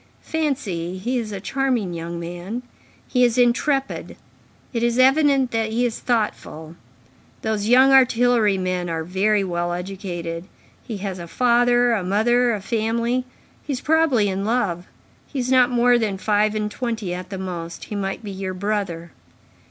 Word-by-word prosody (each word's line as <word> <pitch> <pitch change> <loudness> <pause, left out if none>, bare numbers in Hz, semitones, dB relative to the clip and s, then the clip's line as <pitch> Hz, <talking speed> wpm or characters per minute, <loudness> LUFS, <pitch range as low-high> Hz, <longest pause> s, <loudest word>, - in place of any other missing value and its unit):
Fancy, 215 - -2
he 245 +7 -1
is 220 -2 -5
a 200 - -4
charming 240 -3 -1
young 170 0 -5
man; 175 +8 -6 0.4
he 250 -1 +2
is 240 0 +3
intrepid; 265 +3 +1 0.6
it 230 - -1
is 235 0 +1
evident 270 0 +4
that 225 -1 0
he 235 +3 +1
is 235 -2 -2
thoughtful; 170 -9 -2 0.7
those 215 -2 -1
young 260 +2 +6
artillery 245 -5 +4
men 185 -1 -2
are 165 -1 -2
very 195 +4 +1
well 175 -2 -2
educated; 175 -2 -5 0.4
he 220 - -6
has 195 -2 -5
a 170 - -7
father, 245 +3 +3
a 205 -5 0
mother, 240 +6 +2
a 210 -3 -2
family; 230 +4 -1 0.4
he 290 - -4
is 260 - -4
probably 310 -9 +3
in 195 0 -2
love; 200 -6 -1 0.4
he 285 - -8
is 255 0 -1
not 255 -1 +5
more 245 0 +4
than 210 -4 -1
five 210 +1 +1
and 210 0 -2
twenty 225 -6 -3
at 180 +1 -6
the 195 - -5
most; 175 -3 -6
he 210 - -6
might 195 +2 -3
be 205 - -6
your 190 -1 -5
brother." 185 -4 -3
215 Hz, 165 wpm, -22 LUFS, 185-245 Hz, 0.7 s, young